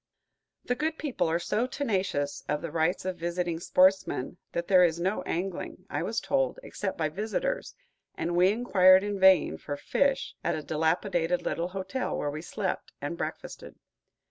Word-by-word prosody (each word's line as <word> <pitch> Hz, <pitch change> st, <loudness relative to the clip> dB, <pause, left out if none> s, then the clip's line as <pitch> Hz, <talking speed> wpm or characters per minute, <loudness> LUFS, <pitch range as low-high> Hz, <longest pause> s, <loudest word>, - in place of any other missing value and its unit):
The 245 Hz, -, +1 dB
good 315 Hz, +5 st, -2 dB
people 285 Hz, -, -1 dB
are 165 Hz, -, +2 dB
so 210 Hz, +7 st, -1 dB
tenacious 190 Hz, -, -1 dB
of 150 Hz, 0 st, -1 dB
the 165 Hz, -, -4 dB
rights 165 Hz, +4 st, 0 dB
of 185 Hz, -1 st, -2 dB
visiting 170 Hz, 0 st, -2 dB
sportsmen 185 Hz, -4 st, +2 dB
that 170 Hz, -, -3 dB
there 185 Hz, -2 st, +6 dB
is 170 Hz, -1 st, +2 dB
no 190 Hz, +4 st, 0 dB
angling, 180 Hz, +2 st, -4 dB
I -, -, -1 dB
was -, -, -1 dB
told, -, -, 0 dB
except 200 Hz, -, -4 dB
by 160 Hz, -, +1 dB
visitors, 360 Hz, -, -3 dB, 0.4 s
and 170 Hz, +1 st, -2 dB
we 180 Hz, +2 st, +5 dB
inquired 190 Hz, -5 st, +5 dB
in 205 Hz, -1 st, -3 dB
vain 185 Hz, -, +5 dB
for 145 Hz, -, -5 dB
fish 275 Hz, -, 0 dB
at 170 Hz, -, +1 dB
the 155 Hz, -, -5 dB
dilapidated 165 Hz, +3 st, 0 dB
little 170 Hz, +1 st, -1 dB
hotel 190 Hz, +7 st, -3 dB
where 145 Hz, -, -2 dB
we 155 Hz, +2 st, -5 dB
slept 170 Hz, -, -3 dB
and -, -, -4 dB
breakfasted. -, -, -6 dB
180 Hz, 170 wpm, -28 LUFS, 165-205 Hz, 0.4 s, there